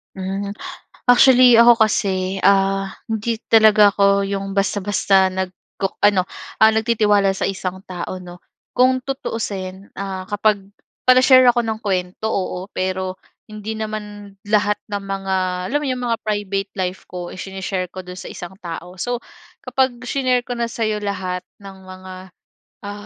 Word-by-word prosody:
Mm. 195 +2 -4 0.6
Actually, 250 -1 +7
ako 235 +1 +8 0.2
kasi, 190 -2 -1
ah, 195 0 +3 0.2
hindi 225 +1 -2
talaga 215 -2 +6
ako 200 0 +2
'yong 195 0 -3
basta-basta 195 -1 +2
nagku 190 +1 -4 0.2
ano 190 -3 +4 0.3
ah 220 - +8
nagtitiwala 215 -3 +2
sa 195 - -2
isang 190 -1 -4
tao, 185 +1 -5
'no. 175 -1 -10 0.4
Kung 255 +1 +4
tutuusin, 200 -7 -5
ah, 190 -1 -5
kapag 205 -1 0 0.4
pala-share 255 0 +7
ako 240 -1 +3
ng 220 -1 -3
kuwento, 190 0 -2
oo, 185 -2 -3
pero 185 0 -2 0.3
hindi 215 0 -6
naman 210 -2 -6
lahat 205 0 +2 0.2
ng 205 - -1
mga, 195 -1 -3 0.4
alam 290 - +2
mo 295 - -3
'yong 255 -1 -2
mga 230 - 0
private 205 -2 -2
life 185 0 -4
ko 175 -1 -7
ishinishare 190 0 -4
ko 185 +1 -9
do'n 180 0 -9
sa - - -8
isang 175 - -8
tao. 175 0 -8
So, 245 +2 -3 0.4
kapag 260 -2 +1
shinare 250 -1 0
ko 245 - -5
na 235 -1 -2
sa 230 0 -3
'yo 215 -1 -1
lahat 190 -3 -3 0.2
ng 195 -1 -12
mga 185 0 -10 0.7
ah 205 0 -8
200 Hz, 150 wpm, -20 LUFS, 190-220 Hz, 0.7 s, ako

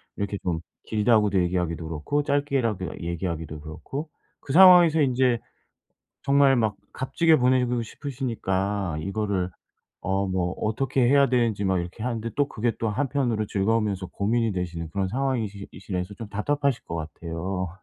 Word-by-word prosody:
이렇게 100 0 -3
좀 85 -3 -1 0.2
길다고도 105 -3 +2
얘기하기도 85 -2 -1
그렇고 85 - -1
짧게라도 135 - -1
얘기하기도 85 -3 -4
그렇고 135 - -6 0.3
그 135 - -6
상황에서 175 -3 +8
인제 125 -3 +2 0.8
정말 140 -1 +5
막 110 -4 +1 0.2
값지게 160 +5 +2
보내고 125 -2 +2
싶으시니까 105 - -2
이거를 100 0 -1 0.5
어 95 +1 0
'뭐 90 -1 -1
어떻게 130 +5 0
해야 140 0 +5
되는지.' 115 -5 +1
막 95 -1 +2
이렇게 90 +5 -6
하는데 115 -1 -2
또 145 0 +2
그게 115 +1 -1
또 115 - -1
한편으로 120 -2 0
즐거우면서 100 -1 0
고민이 110 +5 0
되시는 85 -3 -4
그런 95 +1 -1
상황이시 115 -4 -2
이시라서 90 +1 -5
좀 110 +1 -8
답답하실 140 +5 0
것 85 - -5
같아요. 85 +3 -4
105 Hz, 360 characters per minute, -25 LUFS, 95-130 Hz, 0.8 s, 상황에서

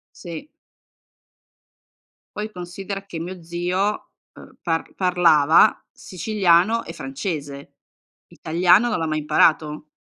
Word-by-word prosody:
Sì. 170 - -9 1.9
Poi 215 +1 -4
considera 195 +2 -7
che 170 -4 -7
mio 175 0 -7
zio, 180 +5 -2 0.3
ehm, - - -15
par 165 -2 -2
parlava 175 -1 +4
siciliano 190 +3 +1
e 165 - -8
francese. 140 -1 -6 0.5
Italiano 175 +8 +2
non 215 - -1
l'ha 160 - -2
mai 155 0 -1
imparato. 150 0 +1
175 Hz, 100 wpm, -22 LUFS, 160-195 Hz, 1.9 s, parlava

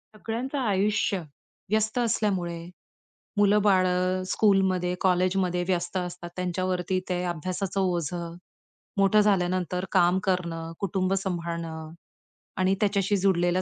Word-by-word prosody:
सगळ्यांचं 235 +6 -4
आयुष्य 205 -3 +1 0.5
व्यस्त 220 +2 +1
असल्यामुळे 190 -7 0 0.8
मुलं-बाळं 185 -3 +3
स्कूलमध्ये, 190 -4 +2
कॉलेजमध्ये 180 -1 +2
व्यस्त 175 -1 -1
असतात. 180 -1 -5
त्यांच्यावरती 180 0 -1
ते 180 -1 0
अभ्यासाचं 180 +3 -3
ओझं, 170 -1 -2 0.6
मोठं 200 +2 +5
झाल्यानंतर 185 -2 +1
काम 180 +2 +4
करणं, 170 -4 -2
कुटुंब 190 -1 0
सांभाळणं 170 -4 -3 0.7
आणि 185 +1 +3
त्याच्याशी 200 -1 +2
जुडलेल्या 185 -1 +2
185 Hz, 95 wpm, -26 LUFS, 175-195 Hz, 0.8 s, मोठं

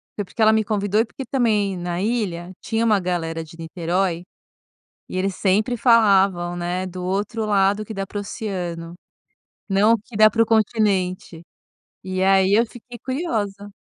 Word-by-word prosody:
foi 205 - -3
porque 220 - -6
ela 220 0 +6
me 220 0 +2
convidou 205 0 0
e - - 0
porque 265 +3 -8
também 210 -7 +1
na 175 +1 -3
ilha 195 -6 -2
tinha 225 0 -1
uma 210 -3 +3
galera 165 -3 -2
de 160 +1 -14
Niterói 170 +1 -2 0.8
e, - - -5
eles 190 0 -1
sempre 210 +5 +1
falavam, 195 -7 +3
né, 175 +2 -2
do 180 0 -7
outro 205 +4 -2
lado 200 0 +2
que 220 - -8
dá 195 0 -3
para 205 - -7
o - - -2
oceano, 175 -5 -5 0.8
não, 200 +3 +4
o 230 - +3
que 215 +1 -12
dá 215 0 +7
para 230 +2 +2
o - - +1
continente. 195 -6 0 0.6
E 185 0 -3
aí, 190 0 +4
eu 230 +3 +4
fiquei 245 +1 -12
curiosa. 210 - -3
200 Hz, 175 wpm, -22 LUFS, 180-220 Hz, 0.8 s, dá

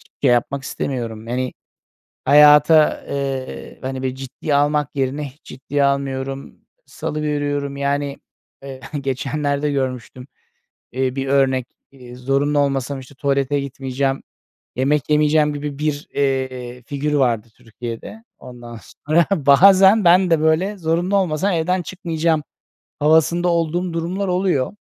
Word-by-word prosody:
hiçbir - - -25
şey 125 - +5
yapmak 130 +3 0
istemiyorum, 115 -5 -4
hani, 125 +2 -2 0.7
hayata, 150 +1 +6
eee, 135 -2 -5
hani, 130 0 -4
bir 130 -1 -2
ciddiye 135 +3 -4
almak 145 0 +2
yerine 135 +2 -1
hiç 140 +2 -14
ciddiye 140 +2 -2
almıyorum, 135 0 -2 0.3
salıveriyorum. 145 -2 -3
Yani, 140 0 -1 0.5
eee, 135 -1 -9 0.2
geçenlerde 140 +2 -2
görmüştüm, 130 -2 -4 0.7
eee, 130 0 -1
bir 135 0 -3
örnek, 135 -2 +2 0.2
eee, 125 -2 -13
zorunlu 140 +3 0
olmasam 135 -1 -1
işte 130 +1 -14
tuvalete 140 0 0
gitmeyeceğim, 135 0 -3 0.5
yemek 140 +3 0
yemeyeceğim 150 0 +3
gibi 145 -1 -5
bir, 150 -1 -2
eee, 130 -3 -2
figür 145 +4 -3
vardı 120 -6 +1
Türkiye'de. 120 - -8 0.2
Ondan 120 -2 -10 0.3
sonra, 160 +2 +4 0.2
bazen 190 +7 +7
ben 180 +1 +5
de 165 - +4
böyle 170 +6 +1
zorunlu 175 +3 0
olmasam 185 +1 0
evden 180 +3 0
çıkmayacağım 165 -4 -1 0.6
havasında 160 +3 +3
olduğum 170 +1 0
durumlar 180 +4 -2
oluyor. 180 -8 0
140 Hz, 125 wpm, -20 LUFS, 130-155 Hz, 0.7 s, bazen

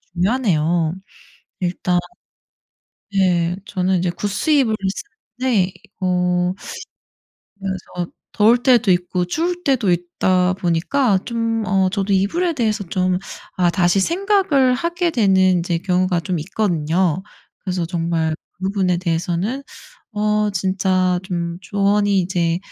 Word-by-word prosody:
중요하네요. 175 -6 +1 0.7
일단 180 0 0 1.2
네. 180 -3 +2
저는 185 -1 0
이제 180 0 0
구스 205 - -3
이불을 255 -8 +3 0.7
쓰는데 195 -8 +2 0.3
어 180 0 +1 1.1
그래서 185 -2 -5 0.3
더울 230 +3 +5
때도 245 -6 +4
있고 180 0 0
추울 345 - -2
때도 250 - +2
있다 180 +1 +1
보니까 190 +6 +1
좀 230 -1 -1
어 190 -1 +3
저도 200 0 -1
이불에 330 - +1
대해서 220 -6 0
좀 185 0 +1 0.4
아 180 -1 +3
다시 175 +1 +2
생각을 340 - +2
하게 340 +4 -1
되는 190 - +3
이제 170 0 -1
경우가 180 0 +1
좀 175 0 -2
있거든요. 175 -2 0 0.4
그래서 180 -3 -2
정말 165 -2 -1 0.2
그 185 - -9
부분에 190 -2 +1
대해서는 175 +8 -1 0.5
어 210 0 +1
진짜 185 -1 +1
좀 170 -2 -3
조언이 200 0 +1
이제 175 -2 0
185 Hz, 245 characters per minute, -20 LUFS, 175-215 Hz, 1.2 s, 더울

